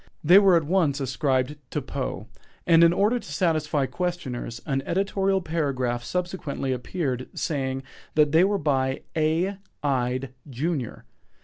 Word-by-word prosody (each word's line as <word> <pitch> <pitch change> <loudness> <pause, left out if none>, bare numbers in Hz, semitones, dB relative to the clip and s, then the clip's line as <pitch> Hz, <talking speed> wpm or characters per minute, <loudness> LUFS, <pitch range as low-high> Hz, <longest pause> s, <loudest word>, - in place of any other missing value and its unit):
They 175 +6 +8
were 195 -3 +5
at 165 - +3
once 155 -3 +1
ascribed 135 +1 0
to - - -2
Poe, 135 -5 -4 0.4
and 165 -1 +6
in 170 - +7
order 210 +7 +2
to 145 - -11
satisfy 155 -3 +1
questioners, 130 -6 -4
an 135 -2 0
editorial 195 +3 0
paragraph 135 -7 -1
subsequently 175 -7 -3
appeared 130 0 -3
saying 135 -3 -2 0.3
they 155 +2 +5
were 200 +1 +2
by 135 -5 0
"A. 165 +5 +1 0.3
Ide, 130 -1 -1 0.2
junior." 135 -1 -3
150 Hz, 130 wpm, -25 LUFS, 130-175 Hz, 0.4 s, They